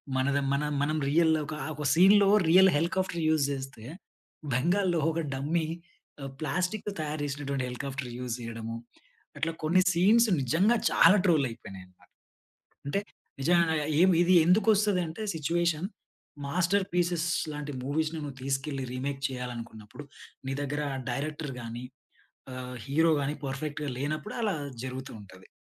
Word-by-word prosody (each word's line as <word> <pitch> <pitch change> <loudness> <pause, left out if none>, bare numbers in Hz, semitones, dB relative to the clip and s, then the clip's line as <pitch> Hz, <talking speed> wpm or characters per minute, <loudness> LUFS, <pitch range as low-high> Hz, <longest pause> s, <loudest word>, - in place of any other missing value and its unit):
మనది 140 +2 +1
మన 140 +1 0 0.2
మనం 155 +2 0
రియల్‌‌‌‌‌లో 160 0 +3
కా 150 - -4 0.2
ఒక 150 0 -5
సీన్‌లో 195 +4 +6 0.2
రియల్ 190 +2 +7
హెలికాప్టర్ 170 +1 -1
యూస్ 155 -3 +3
చేస్తే 135 -4 -6 0.7
బెంగాల్లో 175 +6 +2
ఒక 165 - -2
డమ్మీ, 155 +4 -1 0.7
ప్లాస్టిక్‌తో 185 +6 -2
తయారు 150 0 -3
చేసినటువంటి 140 -2 -3
హెలికాప్టర్ 130 0 -5
యూస్ 125 -2 -3
చేయడము. 115 -1 -6 0.6
అట్లా 165 - -1
కొన్ని 175 +4 +4
సీన్స్ 210 +7 +4
నిజంగా 170 - +3
చాలా 175 +5 +6
ట్రోల్ 160 -7 +4
అయిపోయినాయి 95 -4 -10
అన్నమాట. 90 0 -26 0.8
అంటే 195 +8 0 0.4
నిజంగా 170 +2 +3 0.3
ఏం 185 - +6
ఇది 180 +1 +4
ఎందుకు 195 +5 +3
వస్తది 205 -2 +2
అంటే 170 +7 -6
సిట్యుయేషన్. 170 +2 0 0.6
మాస్టర్‌పీసెస్ 175 0 +1 0.3
లాంటి 150 0 -5
మూవీస్‌‌ని 155 +3 -1
నువ్వు 140 -2 -7
తీసుకెళ్ళి 135 0 -2
రీమేక్ 135 +1 -4
చేయాలనుకున్నప్పుడు, 120 -2 -7 0.4
నీ 135 - -1
దగ్గర 145 +1 -2 0.3
డైరెక్టర్ 150 0 -4
గాని, 120 +2 -6 0.7
ఆహ్, 125 0 -7
హీరో 160 +4 +3
గాని 145 +2 -2
పర్ఫెక్ట్‌గా 145 +2 -4
లేనప్పుడు 155 - -3
అలా 210 -3 +1 0.3
జరుగుతూ 130 +1 -6
ఉంటది. 95 -1 -15
150 Hz, 130 wpm, -28 LUFS, 135-175 Hz, 0.8 s, రియల్